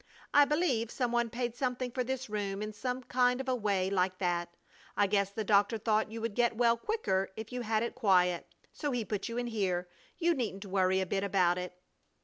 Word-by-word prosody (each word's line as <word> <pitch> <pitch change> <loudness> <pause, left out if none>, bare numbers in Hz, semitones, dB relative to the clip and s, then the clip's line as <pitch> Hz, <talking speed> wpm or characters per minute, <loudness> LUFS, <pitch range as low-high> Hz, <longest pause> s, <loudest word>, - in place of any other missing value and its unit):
I 290 0 +7
believe 280 -7 +1
some 245 -1 -1
one 240 -1 +1
paid 240 0 -3
something 250 -1 -2
for 255 +1 -1
this 260 +1 -3
room 205 -1 -3
in 215 0 -5
some 250 +4 -3
kind 250 0 +2
of 265 - -4
a 260 - +2
way 200 -5 0
like 185 -1 +1
that. 175 -2 -1 0.5
I 205 - +5
guess 200 -1 +1
the 215 +2 -4
doctor 205 +2 +3
thought 215 0 +1
you 225 0 -6
would 230 -2 -2
get 235 0 +1
well 235 -1 +4
quicker 230 - -1
if 220 +1 -7
you 250 0 -3
had 220 -1 0
it 235 - -3
quiet, 180 -7 +2 0.3
so 295 - -3
he 245 -4 -1
put 210 +1 -3
you 230 - -4
in 245 - -1
here. 190 -6 -1 0.3
You 345 0 +2
needn't 215 -8 -3
worry 190 -1 +2
a - - 0
bit 195 +2 -1
about 180 -3 +2
it." 180 0 -6
220 Hz, 220 wpm, -31 LUFS, 195-245 Hz, 0.5 s, I